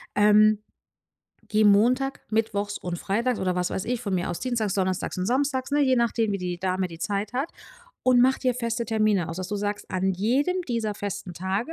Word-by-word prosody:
Ähm, 210 0 +5 0.9
gehe 215 0 +3
Montag, 250 +7 +3
mittwochs 205 -2 -1
und 175 -1 -4
freitags 230 +4 0
oder 185 -1 0
was 180 0 0
weiß 190 - -3
ich, 245 -1 -1
von 200 -5 -2
mir 175 -1 -1
aus 175 - -4
dienstags, 230 -6 -1
donnerstags 185 -1 -1
und 185 - -1
samstags, 260 +2 0
ne, 295 - +3
je 260 -2 +3
nachdem, 230 -2 +1
wie 195 - -1
die 180 -1 -3
Dame 185 0 -1
die 165 -1 -10
Zeit 205 +3 -2
hat, 270 +6 -2 0.5
und 250 -1 +5
mache 260 +1 +4
dir 255 -2 +1
feste 235 -1 -2
Termine 215 -5 +1
aus, 165 - -5
dass 185 0 -4
du 205 - -2
sagst: 205 0 -3
„An 190 +1 0
jedem 275 - +1
dieser 225 -3 -1
festen 200 -3 -5
Tage 195 - -2
210 Hz, 205 wpm, -25 LUFS, 190-245 Hz, 0.9 s, Ähm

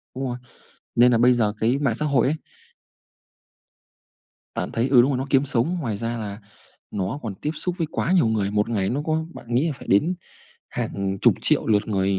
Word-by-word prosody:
Đúng 135 +1 -3
rồi, 125 -1 -3 0.6
nên 125 +1 +5
là 115 - +4
bây 125 +2 +5
giờ 110 -4 +1
cái 120 +5 +2
mạng 140 -6 +1
xã 135 - -2
hội 140 -5 +3
ấy 150 +4 +1 2.2
bạn - - -3
thấy 120 +3 0
ừ, 125 -3 +7
đúng 130 +4 +2
rồi, 130 - 0
nó 130 - -2
kiếm 135 +1 +3
sống, 140 +6 0
ngoài 115 -9 -2
ra 115 +2 -3
là 105 -2 -5 0.5
nó 100 +7 -3
còn 110 -5 -4
tiếp 150 - -3
xúc 180 +3 -3
với 165 - 0
quá 175 - -1
nhiều 175 -10 +4
người. 105 -3 0
Một 105 +1 +1
ngày 100 -5 0
nó 140 +4 -1
có 160 0 0
bạn 120 0 -6
nghĩ 135 +7 +3
là 160 - 0
phải 140 - -12
đến 155 - +3 0.5
hàng 100 -1 -3
chục - - +5
triệu - - +2
lượt 105 -1 +2
người 95 -2 +1
120 Hz, 215 wpm, -23 LUFS, 105-140 Hz, 2.2 s, ừ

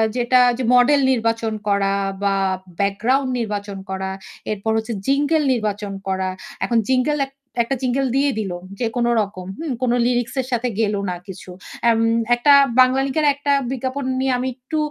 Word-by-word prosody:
যেটা 250 +1 +3 0.2
যে 260 - -2
মডেল 250 +4 +5
নির্বাচন 230 -2 0
করা 200 -1 +2 0.3
বা 200 -1 +2 0.4
ব্যাকগ্রাউন্ড 230 +7 +1
নির্বাচন 205 -3 -4
করা, 190 0 -3 0.4
এরপর 215 +1 -2
হচ্ছে 220 +1 -3
jingle 290 +3 +2
নির্বাচন 210 -3 -3
করা। 190 0 -1 0.4
এখন 235 -1 +2
jingle 265 +3 +2
এক 270 - -18 0.3
একটা 270 +4 -2
jingle 260 +1 0
দিয়ে 280 +1 +3
দিলো 190 -5 -3 0.2
যে 245 - 0
কোনো 240 -1 +1
রকম, 195 -3 -6
হুম? 320 -3 -3
কোনো 245 -1 +2
লিরিক্স 245 0 0
এর 255 - -9
সাথে 240 0 0
গেলো 210 -2 +1
না 180 - -2
কিছু। 190 -1 -10 0.4
এম 225 -1 +3 0.4
একটা 265 +4 +5 0.2
Banglalink 265 +2 +3
এর 305 - +2
একটা 285 0 -1 0.2
বিজ্ঞাপন 265 +2 -3 0.2
নিয়ে 265 0 +1
আমি 255 +1 -2
একটু 260 +5 -5
240 Hz, 165 wpm, -21 LUFS, 205-265 Hz, 0.4 s, মডেল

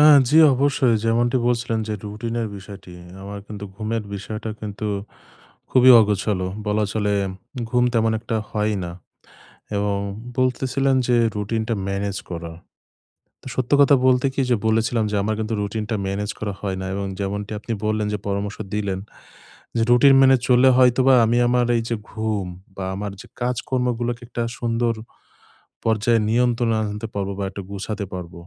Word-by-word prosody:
আ - - +7 0.3
জি 150 - +3 0.2
অবশ্যই। 135 -2 +2
যেমনটি 120 +2 +2
বলছিলেন 115 -2 0
যে 105 - -1
রুটিনের 115 +2 -3
বিষয়টি, 100 -2 -11 0.3
আমার 100 +1 -7
কিন্তু 105 -1 -7
ঘুমের 110 +1 -2
বিষয়টা 105 +2 -5
কিন্তু 105 0 -5 0.8
খুবই 130 0 +6
অগোছালো 100 -3 0 0.2
বলা 105 0 +1
চলে। 105 -2 0 0.6
ঘুম 125 0 +3
তেমন 115 -1 +3
একটা 115 -1 -2
হয়ই 105 0 0
না। 85 - -6 0.8
এবং 100 0 0 0.4
বলতেছিলাম 130 +1 +1
যে 120 - +4 0.2
রুটিনটা 110 +2 -1
ম্যানেজ 100 0 -2
করা। 85 -1 -5 0.9
তো - - -11
সত্য 130 0 -2
কথা 140 0 +6
বলতে 130 +1 +4
কি 135 - 0
যে 120 - +4
বলেছিলাম 110 +1 +1
যে - - -1
আমার 110 +1 0 0.3
রুটিনটা 110 +2 -2
ম্যানেজ 100 +1 -2
করা 105 -2 -3
হয় 95 -2 -2
না। 95 - -4
এবং 100 - -2
যেমনটি 100 +1 -3
আপনি 115 +1 -4
বললেন 110 -1 0
যে - - 0
পরামর্শ 100 +1 -2 0.2
দিলেন, 100 -3 -1 0.8
যে - - +2
রুটিন 135 +3 +7
মেনে 135 -1 +6
চললে 125 +1 +6
হয়তোবা 130 +1 +5
আমি 115 +2 +2
আমার 125 0 +2
এই - - 0
যে 115 - 0 0.2
ঘুম 110 -4 -2 0.3
বা 95 - -4
আমার 100 0 -4
যে - - -14
কাজকর্মগুলোকে 120 -1 -1
একটা 120 0 -4 0.2
সুন্দর 115 0 0 0.9
পর্যায়ে 115 +1 +2
নিয়ন্ত্রণে 120 0 +2
আনতে 105 +1 -4
পারব, 100 -1 -2
বা - - -1
একটু 100 - -6
গুছাতে 100 +2 -4
নিতে 100 - -4
পারব। 90 -2 -7
110 Hz, 155 wpm, -22 LUFS, 100-120 Hz, 0.9 s, আ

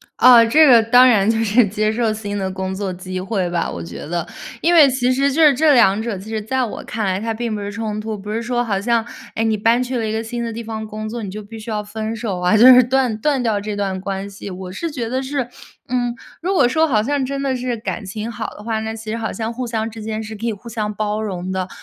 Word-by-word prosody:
啊， 245 -2 +8
这 305 +7 +6
个 235 -4 +7
当 245 +3 +6
然 215 -4 +4
就 225 - +2
是 220 +2 +4
接 215 +2 0
受 225 -2 0
新 205 -1 -5
的 190 -1 -2
工 190 0 -4
作 195 -1 -3
机 185 0 -5
会 190 -3 -1
吧， 175 -1 -1
我 85 - -6
觉 85 +1 -8
得。 170 +2 -3 0.3
因 345 - +3
为 310 -5 +8
其 255 -1 +1
实 275 +2 +2
就 320 - +1
是 300 -3 +7
这 300 +2 +4
两 220 -5 +4
者 225 -3 -3
其 195 +4 -10
实 220 -1 -2
在 260 +5 -1
我 235 - -5
看 220 -1 -3
来 190 -1 0
它 225 0 -2
并 230 -1 -3
不 205 - -4
是 205 0 -4
冲 215 0 -4
突， 215 0 -4
不 205 +1 -7
是 225 - -1
说 240 +1 -1
好 200 -4 -1
像， 230 0 +1 0.3
诶， 225 - 0
你 220 -1 +2
搬 230 +4 +2
去 255 0 -2
了 225 - -1
一 215 - -2
个 220 +1 -1
新 235 +1 -4
的 230 - -3
地 230 +1 -6
方 220 -1 -5
工 215 0 -6
作， 230 +1 -5
你 195 - -5
就 215 - -6
必 215 +2 -11
须 220 +1 -9
要 210 -1 -1
分 215 +1 -5
手 210 -5 -3
啊， 180 +4 +3
就 235 +4 +8
是 255 -1 +9
断 250 -2 +1
断 275 +2 +1
掉 220 -4 0
这 210 0 -4
段 195 -2 -2
关 195 +1 -4
系。 200 0 -9
我 185 0 -7
是 330 - -4
觉 245 -6 -4
得 260 +3 -2
是， 265 -2 -2 0.4
嗯， 245 -1 -1 0.3
如 365 +4 -1
果 275 -10 +4
说 315 +6 +2
好 235 -9 +2
像 275 +3 0
真 275 +1 -3
的 270 -1 0
是 250 -1 -3
感 225 -1 -4
情 210 +4 -5
好 230 -2 -5
的 - - -10
话， 220 -1 -2
那 220 0 -4
其 220 -1 -8
实 225 - -2
好 225 -1 -3
像 225 0 -4
互 250 +1 -4
相 225 -1 -2
之 220 -1 -9
间 220 0 -3
是 220 0 -7
可 220 +2 -6
以 235 - +1
互 215 +3 -10
相 215 -2 -3
包 215 0 -2
容 185 -3 -4
的。 190 0 -2
220 Hz, 305 characters per minute, -19 LUFS, 205-245 Hz, 0.4 s, 是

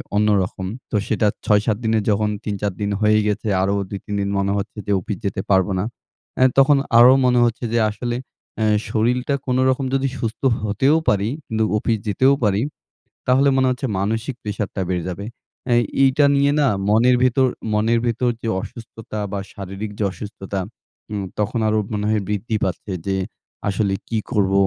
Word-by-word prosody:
অন্যরকম, 100 -3 +1 0.2
তো - - -1
সেটা 110 0 +1 0.2
৬-৭ 105 0 +2
দিনের 110 -1 +1
যখন 105 +1 +1
৩-৪ 100 -1 -2
দিন 100 - 0
হয়ে 110 0 +4
গেছে। 105 +1 -1
আরো 95 +1 +1 0.2
২-৩ 100 +1 -6
দিন 100 - -1
মনে 100 0 0
হচ্ছে 100 +2 -5
যে - - 0
অফিস 95 +2 -5
যেতে 95 -1 -1
পারব 95 -1 +4
না। - - 0 0.5
অ্যা 130 - +5
তখন 135 +1 +6 0.2
আরো 120 +2 +9
মনে 125 -1 +4
হচ্ছে 120 +1 -2
যে 120 - +3
আসলে 120 +3 -3 0.4
অ্যা 110 - +1 0.2
শরীরটা 125 +5 +1
কোনরকম 130 +1 +1
যদি 135 0 +1
সুস্থ 115 -1 -4 0.2
হতেও 110 +8 +2
পারি, 100 +1 +1 0.2
কিন্তু 110 0 0
অফিস 110 +1 0
যেতেও 130 +7 +4
পারি, 105 -1 +2 0.7
তাহলে 130 +2 +4
মনে 130 0 +3
হচ্ছে 125 +1 -2
মানসিক 110 +6 -1
প্রেশারটা 105 -2 -3
বেড়ে 90 -2 -1
যাবে। 100 +3 -6 0.4
অ্যা 120 -2 +3 0.3
এইটা 135 +2 +4
নিয়ে 140 +1 +3
না 145 - +4 0.2
মনের 120 +4 +5
ভেতর 130 +1 +3 0.3
মনের 115 +2 +2
ভেতর 120 +1 +1
যে 115 - -2
অসুস্থতা 115 0 -8
বা 100 - -2
শারীরিক 100 +2 -6
যে 105 - 0
অসুস্থতা, 100 -1 -6 0.5
উম 100 -2 -2 0.2
তখন 110 +3 0
আরও 110 0 +2
মনে 105 0 -1
হয় 110 -1 +1
বৃদ্ধি 105 +2 -1
পাচ্ছে। 95 +2 -4
যে 95 -1 0 0.5
আসলে 100 0 0
কী 115 - -1
করব? 95 -2 +2
110 Hz, 170 wpm, -21 LUFS, 100-120 Hz, 0.7 s, আরো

